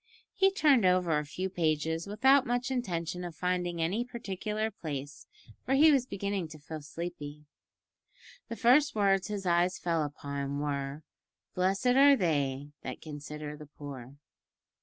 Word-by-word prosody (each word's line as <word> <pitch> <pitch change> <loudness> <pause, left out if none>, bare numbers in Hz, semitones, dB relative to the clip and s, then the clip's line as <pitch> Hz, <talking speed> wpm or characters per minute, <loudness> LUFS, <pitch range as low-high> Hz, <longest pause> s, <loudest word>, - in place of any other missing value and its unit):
He 385 0 +4
turned 295 - +4
over 180 -4 +3
a 150 - -4
few 185 +6 -3
pages 160 -1 -1
without 265 +6 +4
much 245 +2 -1
intention 180 -8 -2
of 175 -2 -6
finding 180 0 -1
any 185 +9 0
particular 215 -2 -3
place, 145 -6 -7 0.4
for 270 - +1
he 310 +3 +7
was 265 -3 +2
beginning 200 -5 -3
to 155 0 -11
feel 155 +1 -8
sleepy. 150 -1 -7 1.0
The 230 - -4
first 265 +5 +4
words 195 -2 +2
his 205 -2 -4
eyes 175 +1 +2
fell 170 -2 0
upon 140 -1 -4
were, 145 0 -3 0.5
"Blessed 190 +5 0
are 275 +3 +7
they 145 - -1
that 130 - -6
consider 150 0 -7
the 150 0 -11
poor." 140 -3 -9
175 Hz, 145 wpm, -30 LUFS, 150-215 Hz, 1.0 s, he